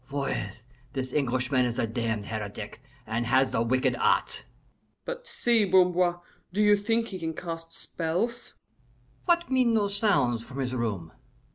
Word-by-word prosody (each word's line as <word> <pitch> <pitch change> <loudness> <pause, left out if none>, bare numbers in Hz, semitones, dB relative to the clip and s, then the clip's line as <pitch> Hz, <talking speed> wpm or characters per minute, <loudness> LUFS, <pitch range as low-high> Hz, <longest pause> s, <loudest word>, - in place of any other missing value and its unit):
Voyez, 120 -7 -3 0.3
this 130 -1 -3
Englishman 130 -2 +1
is 120 -1 -1
a 115 - +1
damned 110 -2 -2
heretic, 105 -1 -6 0.2
and 115 +2 -2
has 130 +2 +3
the - - +1
wicked 130 +3 +2
arts." - - +1 0.6
"But - - -5
see, 235 - +3
Bamboir, 180 -2 +3 0.3
do 210 +4 +1
you 210 0 +6
think 225 +3 0
he 185 - -6
can 160 -1 -3
cast 165 -1 -6
spells?" 180 +9 -3 0.7
"What 345 -3 +2
mean 250 -3 +3
those 200 -2 +2
sounds 125 - +3
from 130 +3 -10
his 130 -2 -2
room?" 105 -10 -2
145 Hz, 150 wpm, -27 LUFS, -, 0.7 s, you